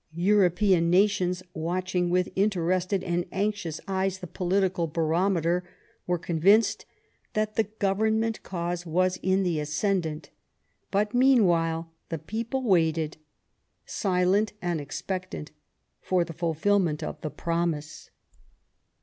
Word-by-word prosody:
European 185 Hz, -1 st, +3 dB
nations, 185 Hz, -1 st, +2 dB
watching 180 Hz, +2 st, -1 dB
with 180 Hz, +1 st, +1 dB
interested 185 Hz, -1 st, +1 dB
and 175 Hz, 0 st, 0 dB
anxious 200 Hz, -5 st, -2 dB
eyes 190 Hz, -1 st, 0 dB
the 185 Hz, -, -8 dB
political 180 Hz, 0 st, 0 dB
barometer, 170 Hz, +2 st, +1 dB, 0.4 s
were 175 Hz, 0 st, +1 dB
convinced 200 Hz, +6 st, +2 dB, 0.5 s
that 215 Hz, 0 st, 0 dB
the 225 Hz, -, +2 dB
Government 220 Hz, +2 st, 0 dB
cause 175 Hz, -1 st, -3 dB
was 185 Hz, +2 st, 0 dB
in 190 Hz, +1 st, +2 dB
the 170 Hz, -4 st, 0 dB
ascendant. 155 Hz, +1 st, -1 dB, 0.6 s
But 205 Hz, +2 st, 0 dB
meanwhile 170 Hz, -11 st, +3 dB, 0.2 s
the 165 Hz, -, -2 dB
people 230 Hz, -, -3 dB
waited, 160 Hz, -7 st, +1 dB, 0.7 s
silent 190 Hz, +2 st, +1 dB
and 175 Hz, -4 st, -2 dB
expectant, 180 Hz, +2 st, -5 dB, 0.5 s
for 180 Hz, -2 st, +1 dB
the 165 Hz, -, -8 dB
fulfilment 165 Hz, 0 st, +1 dB
of 150 Hz, -, -6 dB
the 155 Hz, -, -3 dB
promise. 165 Hz, 0 st, -3 dB
180 Hz, 110 wpm, -27 LUFS, 165-200 Hz, 0.7 s, European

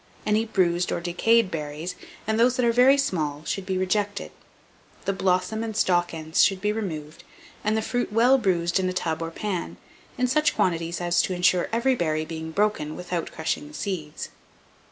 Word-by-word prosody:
Any 215 Hz, +1 st, +2 dB
bruised 180 Hz, -4 st, +1 dB
or -, -, -1 dB
decayed 190 Hz, +5 st, +2 dB
berries, 155 Hz, +2 st, -4 dB, 0.3 s
and 220 Hz, +1 st, 0 dB
those 245 Hz, +2 st, +4 dB
that 250 Hz, -, +1 dB
are 235 Hz, -, +4 dB
very 255 Hz, +4 st, +6 dB
small, 155 Hz, -, -1 dB
should 195 Hz, -1 st, -3 dB
be 190 Hz, -1 st, 0 dB
rejected. 205 Hz, +2 st, -1 dB, 0.7 s
The 195 Hz, -, +1 dB
blossom 185 Hz, +3 st, 0 dB
and 220 Hz, -2 st, -4 dB
stalk 175 Hz, -4 st, +2 dB
ends 160 Hz, -1 st, +1 dB
should 195 Hz, -1 st, +3 dB
be 210 Hz, +2 st, 0 dB
removed, 160 Hz, -8 st, -5 dB, 0.4 s
and 215 Hz, +1 st, +1 dB
the 220 Hz, -, -1 dB
fruit 245 Hz, -1 st, -1 dB
well 245 Hz, +5 st, +5 dB
bruised 175 Hz, -4 st, +1 dB
in 185 Hz, -1 st, 0 dB
a -, -, -3 dB
tub 165 Hz, -3 st, -2 dB
or 165 Hz, -, -2 dB
pan, 170 Hz, -, -4 dB, 0.4 s
in 250 Hz, -, +2 dB
such 300 Hz, +4 st, +2 dB
quantities 170 Hz, -1 st, 0 dB
as 175 Hz, 0 st, +3 dB
to 185 Hz, -, -2 dB
insure 180 Hz, 0 st, +2 dB
each 240 Hz, +3 st, +1 dB
berry 155 Hz, -2 st, 0 dB
being 160 Hz, 0 st, -6 dB
broken 160 Hz, -5 st, 0 dB
without 180 Hz, -1 st, -4 dB
crushing 160 Hz, -, -3 dB
the 305 Hz, -, -12 dB
seeds. 165 Hz, -7 st, -4 dB
185 Hz, 185 wpm, -25 LUFS, 165-220 Hz, 0.7 s, very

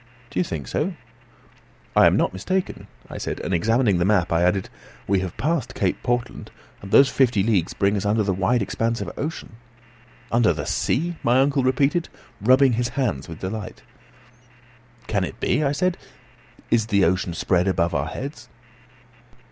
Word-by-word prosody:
"Do -, -, -2 dB
you -, -, +3 dB
think 75 Hz, -7 st, -5 dB
so?" -, -, -2 dB, 1.0 s
"I -, -, +7 dB
am -, -, +3 dB
not -, -, +1 dB
mistaken," 185 Hz, -, -3 dB, 0.2 s
I -, -, -8 dB
said, -, -, -4 dB
and 95 Hz, -, -3 dB
examining 105 Hz, +2 st, +2 dB
the -, -, +2 dB
map, 95 Hz, -3 st, +2 dB
I 85 Hz, -, +2 dB
added, 90 Hz, +2 st, +1 dB, 0.4 s
"We 100 Hz, -1 st, +2 dB
have 90 Hz, -2 st, -5 dB
passed 155 Hz, +1 st, -1 dB
Cape -, -, -1 dB
Portland, 120 Hz, -1 st, -2 dB, 0.3 s
and 100 Hz, -, -9 dB
those 135 Hz, +7 st, +6 dB
fifty 120 Hz, -7 st, +2 dB
leagues 100 Hz, -6 st, 0 dB
bring 100 Hz, +1 st, +1 dB
us 100 Hz, -, -2 dB
under 105 Hz, +1 st, +1 dB
the 100 Hz, -1 st, 0 dB
wide 100 Hz, +5 st, +1 dB
expanse 115 Hz, +3 st, -1 dB
of -, -, -4 dB
ocean." 150 Hz, -7 st, -6 dB, 0.7 s
"Under 115 Hz, -1 st, +3 dB
the 75 Hz, -3 st, -5 dB
sea," 170 Hz, +4 st, -1 dB
my 120 Hz, +2 st, +3 dB
uncle 140 Hz, +1 st, +2 dB
repeated, 140 Hz, +6 st, +1 dB, 0.3 s
rubbing 130 Hz, +3 st, +5 dB
his 120 Hz, +1 st, 0 dB
hands 80 Hz, -, -1 dB
with 80 Hz, -, -9 dB
delight. 105 Hz, +3 st, -6 dB, 1.2 s
"Can 100 Hz, -3 st, 0 dB
it -, -, -6 dB
be?" 150 Hz, +5 st, +1 dB
I 140 Hz, -, +1 dB
said. 180 Hz, +4 st, 0 dB, 0.7 s
"Is 110 Hz, -2 st, +2 dB
the 100 Hz, -3 st, +3 dB
ocean 90 Hz, 0 st, 0 dB
spread 90 Hz, +1 st, +1 dB
above 85 Hz, -3 st, +1 dB
our 75 Hz, +1 st, -1 dB
heads?" 130 Hz, -, -7 dB
110 Hz, 170 wpm, -23 LUFS, 95-130 Hz, 1.2 s, I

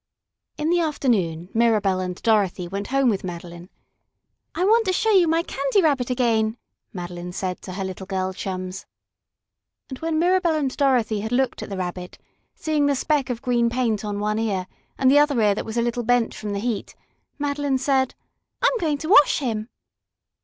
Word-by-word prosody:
In 305 Hz, +2 st, 0 dB
the 350 Hz, -, +3 dB
afternoon 205 Hz, -, 0 dB
Mirabell 215 Hz, -5 st, +2 dB
and 180 Hz, -1 st, -4 dB
Dorothy 200 Hz, -5 st, +2 dB
went 200 Hz, +3 st, -4 dB
home 275 Hz, 0 st, +2 dB
with 205 Hz, -5 st, +1 dB
Madeline. 175 Hz, 0 st, -8 dB, 0.9 s
"I 360 Hz, -, +1 dB
want 450 Hz, +1 st, +4 dB
to 370 Hz, -, +2 dB
show 445 Hz, +4 st, +2 dB
you 370 Hz, -4 st, +5 dB
my 330 Hz, +1 st, +2 dB
Candy 275 Hz, +3 st, 0 dB
Rabbit 280 Hz, -8 st, +2 dB
again," 230 Hz, -3 st, +1 dB, 0.3 s
Madeline 175 Hz, -3 st, -6 dB
said 185 Hz, -1 st, -3 dB
to 185 Hz, -, -8 dB
her 195 Hz, +1 st, -4 dB
little 190 Hz, 0 st, -6 dB
girl 190 Hz, -1 st, -2 dB
chums. 185 Hz, 0 st, -5 dB, 1.0 s
And 260 Hz, -, -7 dB
when 325 Hz, -1 st, -1 dB
Mirabell 350 Hz, 0 st, +2 dB
and 275 Hz, -4 st, -1 dB
Dorothy 245 Hz, -7 st, +2 dB
had 220 Hz, +2 st, -4 dB
looked 260 Hz, 0 st, 0 dB
at -, -, -7 dB
the 195 Hz, -, -5 dB
Rabbit, 180 Hz, 0 st, -5 dB, 0.4 s
seeing 300 Hz, -2 st, 0 dB
the 285 Hz, -, +2 dB
speck 285 Hz, -1 st, 0 dB
of 240 Hz, -2 st, -4 dB
green 240 Hz, -1 st, +2 dB
paint 235 Hz, -4 st, 0 dB
on 205 Hz, -1 st, -3 dB
one 210 Hz, +1 st, -1 dB
ear 200 Hz, -5 st, -1 dB, 0.3 s
and 260 Hz, -1 st, +4 dB
the 290 Hz, -, +6 dB
other 290 Hz, -4 st, +3 dB
ear 210 Hz, -2 st, +4 dB
that 200 Hz, -, -4 dB
was 225 Hz, +1 st, -5 dB
a 235 Hz, -, +2 dB
little 240 Hz, 0 st, -1 dB
bent 245 Hz, 0 st, +1 dB
from 210 Hz, -, -6 dB
the -, -, -2 dB
heat, 225 Hz, -1 st, -3 dB, 0.4 s
Madeline 285 Hz, -1 st, -1 dB
said: 265 Hz, -1 st, +1 dB, 0.5 s
"I'm -, -, +3 dB
going 310 Hz, -5 st, 0 dB
to 310 Hz, -, -6 dB
wash 295 Hz, -7 st, +6 dB
him!" 230 Hz, -5 st, -3 dB
235 Hz, 190 wpm, -23 LUFS, 195-285 Hz, 1.0 s, the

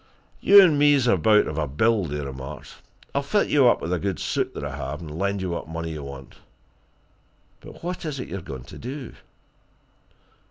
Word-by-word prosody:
"You 200 Hz, 0 st, +8 dB
and 155 Hz, -6 st, +3 dB
me's 145 Hz, -3 st, +4 dB
about 110 Hz, -3 st, +4 dB
of 80 Hz, +1 st, -4 dB
a 75 Hz, -, -1 dB
build," 95 Hz, +4 st, +1 dB
he 75 Hz, -, -3 dB
remarked. 70 Hz, +1 st, -8 dB, 0.4 s
"I'll 140 Hz, -, +1 dB
fit 200 Hz, +9 st, 0 dB
you 140 Hz, -4 st, +5 dB
up 120 Hz, -, +3 dB
with 85 Hz, -, -2 dB
a 90 Hz, -, 0 dB
good 95 Hz, -2 st, -2 dB
suit -, -, -2 dB
that -, -, -5 dB
I -, -, -5 dB
have, 70 Hz, +3 st, -5 dB
and 75 Hz, -3 st, -8 dB
lend 100 Hz, 0 st, -1 dB
you 90 Hz, -, -2 dB
what 85 Hz, -, -4 dB
money 80 Hz, 0 st, -4 dB
you 75 Hz, -2 st, -6 dB
want. 70 Hz, -2 st, -10 dB, 1.2 s
But -, -, -13 dB
what 180 Hz, +1 st, -4 dB
is 150 Hz, -4 st, -4 dB
it -, -, -5 dB
you're 95 Hz, -, -5 dB
going 65 Hz, -5 st, -8 dB
to -, -, -11 dB
do?" 130 Hz, +1 st, -7 dB
95 Hz, 200 wpm, -24 LUFS, -, 1.2 s, You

